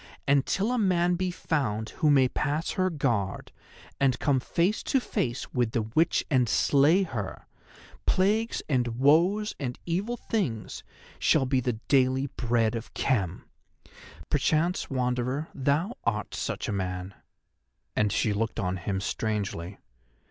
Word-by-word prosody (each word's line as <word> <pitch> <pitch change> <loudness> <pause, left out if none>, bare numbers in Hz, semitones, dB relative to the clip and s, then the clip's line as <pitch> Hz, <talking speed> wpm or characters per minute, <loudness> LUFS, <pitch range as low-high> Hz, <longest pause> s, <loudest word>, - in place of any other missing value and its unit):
And 140 -1 +3
till 205 +5 0
a 250 - +1
man 180 -3 +2
be 185 +1 -1
found 115 -11 -2
who 155 - +4
may 135 -3 +5
pass 150 +5 -1
her 185 -1 +1
guard, 120 - -1 0.5
and 130 -2 +3
come 140 -3 +2
face 175 - 0
to 270 - +1
face 130 - -3
with 120 -3 0
the 115 - +1
witch 140 +10 +1
and 125 -4 +3
slay 150 - +4
her, 110 - -5 0.6
plagues 215 +5 +1
and 120 -5 0
woes 175 - +3
and 125 -3 -3
evil 200 +8 -1
things 145 - -3 0.4
shall 145 -4 +3
be 130 0 +2
the 125 -1 -1
daily 130 0 +3
bread 115 -2 +1
of 115 0 -6
Khem. 95 -9 0 0.8
Perchance, 160 +4 +1
Wanderer, 125 +3 -1
thou 145 - 0
art 105 -2 -1
such - - -3
a - - -1
man," 90 0 -3 0.8
and 105 -1 +2
she 105 - +1
looked 110 +2 -2
on 95 -2 -1
him 95 +2 -3
strangely. 100 -4 -3
130 Hz, 140 wpm, -27 LUFS, 110-165 Hz, 0.8 s, may